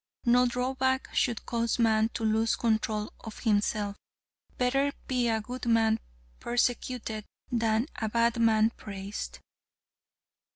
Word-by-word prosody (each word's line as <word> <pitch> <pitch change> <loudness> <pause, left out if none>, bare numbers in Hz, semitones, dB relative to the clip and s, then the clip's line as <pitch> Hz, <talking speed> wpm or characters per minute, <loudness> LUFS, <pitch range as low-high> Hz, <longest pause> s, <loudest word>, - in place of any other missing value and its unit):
No 245 +1 +5
drawback 260 +2 0
should 235 -4 0
cause 235 -1 0
man 220 -2 +3
to - - -3
lose 220 +1 +2
control 220 -2 0
of 220 - -9
himself. 205 -2 0 0.6
Better 270 +3 +2 0.2
be 250 -2 +1
a 220 -1 +1
good 245 +3 -6
man 225 -1 +3 0.4
persecuted, 240 -2 -1 0.3
than 225 -1 +2
a 220 -2 -1
bad 235 +1 +2
man 220 -1 +4
praised. 200 -2 -6
230 Hz, 120 wpm, -29 LUFS, 220-245 Hz, 0.6 s, No